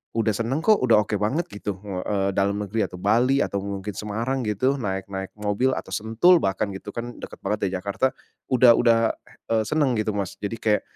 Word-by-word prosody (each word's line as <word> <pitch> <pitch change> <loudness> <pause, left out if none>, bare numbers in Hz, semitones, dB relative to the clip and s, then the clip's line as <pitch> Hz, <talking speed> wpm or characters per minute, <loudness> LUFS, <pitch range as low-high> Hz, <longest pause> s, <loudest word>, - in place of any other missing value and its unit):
udah 110 -3 +1
seneng 120 +6 -1
kok, 215 +6 +5
udah 115 -4 +4
oke 105 - -3
banget 135 +12 0
gitu, 100 -2 -5
uh, 90 -2 -3
eee, 100 -1 0
dalam 100 +1 +1
negeri 105 +2 -1
atau 90 - -10
Bali 120 +7 +3
atau 100 - -2
mungkin 100 0 -5
Semarang 115 +5 -2
gitu 115 +6 +1
naik 95 -7 -3
naik 95 -1 -5
mobil 105 +6 +1
atau - - -6
Sentul 115 +12 +4
bahkan 95 +2 0
gitu - - -8
kan 120 +1 -5
deket - - -9
banget 105 - -1
dari 95 - -4
Jakarta, 100 +7 0 0.4
udah 125 -2 +7
udah, 115 -1 +3 0.4
eee, 110 -1 +3
seneng 145 -5 +1
gitu, 110 0 0
Mas. 100 -2 -3
Jadi 105 +3 -3
kayak 105 -2 +2
110 Hz, 205 wpm, -24 LUFS, 100-120 Hz, 0.4 s, udah